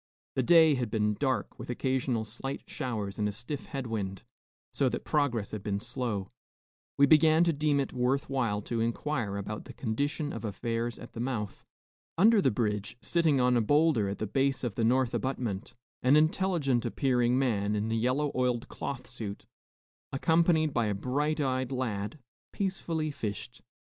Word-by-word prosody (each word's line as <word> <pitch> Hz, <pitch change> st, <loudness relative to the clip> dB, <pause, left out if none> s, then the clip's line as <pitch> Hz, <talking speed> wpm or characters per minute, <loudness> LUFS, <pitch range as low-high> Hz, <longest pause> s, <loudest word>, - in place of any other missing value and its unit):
The 130 Hz, -, +1 dB
day 160 Hz, +3 st, +6 dB
had 125 Hz, -4 st, -1 dB
been 105 Hz, -1 st, +1 dB
dark, 130 Hz, +4 st, -2 dB
with -, -, -8 dB
occasional 125 Hz, -2 st, 0 dB
slight 135 Hz, +5 st, -5 dB
showers 105 Hz, -6 st, -4 dB
and 105 Hz, 0 st, +1 dB
a -, -, -2 dB
stiff 120 Hz, +7 st, -6 dB
head 135 Hz, -2 st, -4 dB
wind, 100 Hz, -4 st, -4 dB, 0.5 s
so -, -, +2 dB
that -, -, -4 dB
progress 125 Hz, -9 st, 0 dB
had 110 Hz, -, -4 dB
been 100 Hz, -1 st, -2 dB
slow. 120 Hz, -5 st, -3 dB, 0.7 s
We 140 Hz, -, +7 dB
began 155 Hz, +2 st, +6 dB
to 170 Hz, -1 st, +2 dB
deem 145 Hz, -1 st, +1 dB
it 135 Hz, -, -2 dB
worth 130 Hz, +3 st, +1 dB
while 115 Hz, -7 st, -1 dB
to 115 Hz, +1 st, -2 dB
inquire 115 Hz, -3 st, -1 dB
about 105 Hz, +2 st, -5 dB
the -, -, -10 dB
condition 145 Hz, +6 st, -2 dB
of -, -, -6 dB
affairs 115 Hz, +2 st, -2 dB
at 120 Hz, -, -11 dB
the -, -, -7 dB
mouth. 115 Hz, -5 st, -3 dB, 0.5 s
Under 215 Hz, +4 st, +6 dB
the -, -, +4 dB
bridge, 105 Hz, -1 st, -2 dB
sitting 160 Hz, -2 st, +2 dB
on 125 Hz, 0 st, +3 dB
a 120 Hz, -, +4 dB
bowlder 145 Hz, -4 st, +3 dB
at 100 Hz, -, -3 dB
the -, -, -2 dB
base 135 Hz, +5 st, 0 dB
of 120 Hz, -4 st, -1 dB
the 115 Hz, -, -1 dB
north 125 Hz, +1 st, +2 dB
abutment, 120 Hz, -7 st, -3 dB, 0.3 s
an 130 Hz, +3 st, +5 dB
intelligent 155 Hz, -5 st, +2 dB
appearing 125 Hz, -2 st, +1 dB
man 105 Hz, -6 st, +1 dB
in 105 Hz, +2 st, -1 dB
a -, -, +1 dB
yellow 130 Hz, +6 st, +1 dB
oiled 125 Hz, -2 st, 0 dB
cloth 125 Hz, -3 st, -5 dB
suit, 110 Hz, -5 st, -6 dB, 0.7 s
accompanied 160 Hz, +1 st, +3 dB
by 120 Hz, -3 st, +1 dB
a 105 Hz, -, 0 dB
bright 145 Hz, +9 st, -1 dB
eyed 130 Hz, -2 st, 0 dB
lad, 115 Hz, -2 st, -2 dB, 0.3 s
peacefully 170 Hz, -5 st, -2 dB
fished. 120 Hz, 0 st, -5 dB
125 Hz, 175 wpm, -30 LUFS, 110-145 Hz, 0.7 s, We